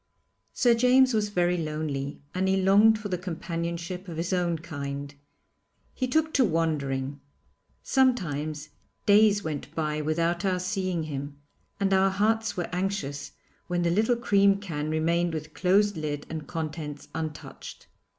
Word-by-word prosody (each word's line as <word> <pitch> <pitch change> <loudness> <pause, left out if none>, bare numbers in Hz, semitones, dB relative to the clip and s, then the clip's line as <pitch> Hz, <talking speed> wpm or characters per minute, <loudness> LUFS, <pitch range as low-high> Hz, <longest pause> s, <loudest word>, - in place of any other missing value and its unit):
Sir 240 -2 +4
James 250 +2 +5
was 210 -1 +1
very 180 -2 +1
lonely 150 -3 -3
and 185 +1 0
he 190 0 +3
longed 205 +4 +5
for 215 -1 -6
the 180 -3 -2
companionship 170 +1 -4
of 165 -2 -6
his 170 +3 -2
own 175 -2 +1
kind. 140 -2 -6 0.8
He 255 - -2
took 315 +4 +1
to 265 - +4
wandering. 145 - -1 0.6
Sometimes 155 - 0 0.4
days 205 0 +5
went 155 0 -5
by 155 -1 -1
without 170 +4 0
our 190 -2 +1
seeing 185 -2 -1
him, 140 -1 -5 0.4
and 195 -1 +2
our 190 0 +4
hearts 220 +2 0
were 175 - -1
anxious 180 -7 -3 0.3
when 175 0 0
the 170 - +2
little 220 +6 +3
cream 200 -4 +3
can 155 -6 -4
remained 165 +2 +1
with 155 0 -6
closed 200 +3 +3
lid 150 -2 -3
and 155 -2 -5
contents 155 -2 -5
untouched. 155 -2 -7
175 Hz, 145 wpm, -27 LUFS, 155-200 Hz, 0.8 s, James